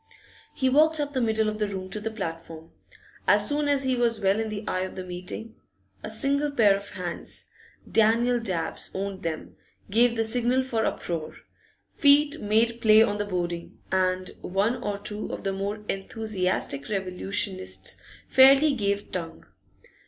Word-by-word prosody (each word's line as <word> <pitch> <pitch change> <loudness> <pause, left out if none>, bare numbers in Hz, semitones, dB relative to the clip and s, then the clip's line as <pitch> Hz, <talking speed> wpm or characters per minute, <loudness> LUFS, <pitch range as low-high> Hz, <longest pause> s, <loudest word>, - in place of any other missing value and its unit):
He 260 - 0
walked 310 +4 +4
up 290 -1 -2
the 260 - 0
middle 220 -1 +1
of 215 0 -3
the 210 - +1
room 190 -2 -5
to 215 - -3
the 215 +2 -3
platform. 165 -6 -7 0.6
As - - +5
soon 295 0 0
as 280 -1 +2
he 260 -1 +1
was 235 -2 +1
well 195 +1 +2
in 220 -1 -2
the 210 0 -6
eye 185 - 0
of 185 0 -4
the 185 - -5
meeting, 180 +5 -7 0.5
a - - -6
single 280 +6 +1
pair 220 -8 +4
of 200 0 -7
hands 175 -2 -6 0.4
Daniel 235 +3 +3
Dabbs 185 -8 -3
owned 195 0 -4
them 160 -2 -5 0.3
gave 235 +2 +4
the 225 - +1
signal 245 +3 +1
for 230 -4 -1
uproar; 165 -3 -3 0.6
feet 290 +1 +4
made 230 +3 +1
play 215 0 +7
on 205 -2 -1
the 205 - -2
boarding, 175 -3 -4
and 185 0 0
one 200 +7 0
or 205 -1 -2
two 210 +1 -5
of - - -6
the 195 -1 -1
more 200 +2 -4
enthusiastic 195 -8 -2
revolutionists 185 - -1 0.3
fairly 275 +3 +6
gave 200 -4 -1
tongue. 165 -3 -5
210 Hz, 165 wpm, -26 LUFS, 185-240 Hz, 0.6 s, play